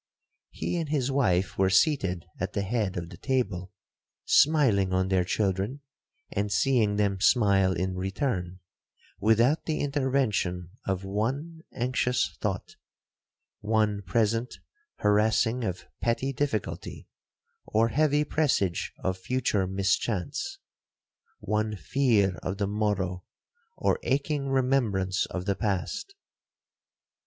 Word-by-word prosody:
He - - -3
and 160 -3 -2
his 140 -3 0
wife 95 -11 +1
were 95 -1 +4
seated 95 - +2
at - - -3
the 100 - -1
head 100 -2 -1
of 85 -1 -4
the - - -11
table, 120 -9 -1 0.5
smiling 130 -11 +4
on 95 0 +1
their 95 -2 +3
children, 100 +7 -1 0.5
and 100 +1 -1
seeing 110 -2 +2
them 100 -2 +1
smile 100 -6 +4
in 90 +2 -1
return, 95 -1 -2 0.6
without 115 +8 +3
the 155 - -1
intervention 130 - 0 0.2
of 95 -1 -1
one 135 +12 -2
anxious 125 0 0
thought,—one 105 +1 -4
present 115 +5 0 0.4
harassing 110 +3 +2
of 90 -4 -3 0.2
petty 125 +4 0
difficulty, 130 -7 -3 0.6
or 115 +1 +2
heavy 150 +2 +2
presage 140 - 0
of 95 0 -1
future 105 -3 0
mischance,—one 100 +2 -3
fear 100 - +2
of 95 +3 -3
the 100 - 0
morrow, 100 -3 -1 0.5
or - - +1
aching 140 +1 0
remembrance 120 -8 +1
of 90 0 -5
the 100 -1 +1
past. 110 - -2
105 Hz, 110 wpm, -27 LUFS, 95-130 Hz, 0.6 s, were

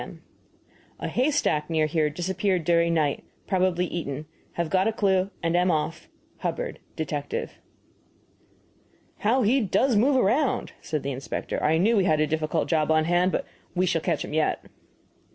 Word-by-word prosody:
M. - - -10 0.8
A - - -3
haystack 250 - +1
near 160 -2 +2
here 155 0 +1
disappeared 185 +3 -1
during 170 +1 +2
night. 150 -3 0 0.2
Probably 185 -2 +1
eaten. 155 -4 -4 0.3
Have 170 -2 -2
got 190 +2 +3
a - - +2
clue, 195 -3 +1
and 165 +1 +1
am 180 +1 +3
off. 155 0 -2 0.3
HUBBARD, - - -3 0.2
Detective. 145 -2 -4 1.6
"How 240 +5 +2
he 255 +6 +3
does 220 +5 +2
move 260 +7 +4
around!" 255 +4 +1
said 155 -4 -3
the 140 - -2
inspector 135 +1 -4
"I 160 +2 +3
knew 215 +7 +3
we 195 - +3
had 155 -4 +3
a 155 - +3
difficult 155 0 -1
job 155 -2 +1
on 155 0 +3
hand, 175 +2 +2
but - - -1 0.3
we 180 +1 +2
shall 170 -3 +1
catch - - -1
him - - -8
yet." 155 0 0
170 Hz, 165 wpm, -26 LUFS, 155-195 Hz, 1.6 s, move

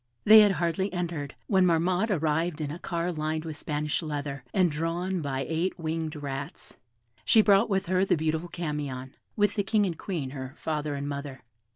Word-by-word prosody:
They 215 +1 +9
had 205 -2 +6
hardly 170 +3 -1
entered, 170 -6 -3
when 190 -2 +3
Marmotte 180 +4 +2
arrived 160 -2 0
in 150 -2 -3
a 165 - -6
car 170 -1 -2
lined 155 0 -2
with 160 -2 -5
Spanish 150 +1 -2
leather, 145 -3 -4
and 185 -4 +3
drawn 170 +4 -2
by 135 -2 -2
eight 165 +4 -1
winged 160 -1 -3
rats. 140 -1 -6 0.5
She 220 -2 +5
brought 205 +2 +4
with 195 -2 +1
her 185 +1 +2
the 195 - +2
beautiful 160 +2 -1
Camion, 145 -6 -4 0.2
with 205 -1 +2
the 205 - 0
King 205 +1 +2
and 175 -3 -2
Queen, 160 -9 -3
her 130 0 -7
father 150 -2 -2
and 140 0 -4
mother. 140 -2 -6
160 Hz, 185 wpm, -28 LUFS, 150-185 Hz, 0.5 s, They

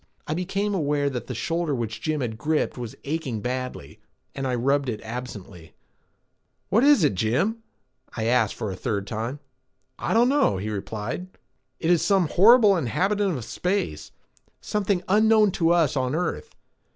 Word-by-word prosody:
I 155 - -2
became 195 +4 -2
aware 145 -5 0
that 120 -3 -5
the 125 - -5
shoulder 165 +3 -1
which 110 -2 -4
Jim 155 +1 -1
had 115 -3 -3
gripped 150 +6 -1
was 120 -3 -7
aching 140 -6 -3
badly, 125 - -5 0.3
and 135 -1 -3
I 125 - 0
rubbed 135 +2 +1
it 110 - -3
absently. 110 -7 -8 0.9
"What 220 +6 +3
is 285 - +6
it, 145 - +3
Jim?" 120 - 0 0.6
I 110 - -1
asked 115 -3 +2
for 105 - -4
the - - -5
third 100 +1 -2
time. 115 +7 -4 0.6
"I - - -1
don't 235 +2 +5
know," 275 - +2
he 105 +3 -4
replied. 105 - -4 0.5
"It 165 - +1
is 175 - +4
some 190 -6 +2
horrible 215 +1 +6
inhabitant 190 - 0
of 120 - -7
space, 180 - -2 0.5
something 200 -3 -1
unknown 215 +1 +4
to 165 -3 +1
us 170 -5 +3
on 130 +1 0
earth. 180 - -3
145 Hz, 165 wpm, -25 LUFS, 115-185 Hz, 0.9 s, is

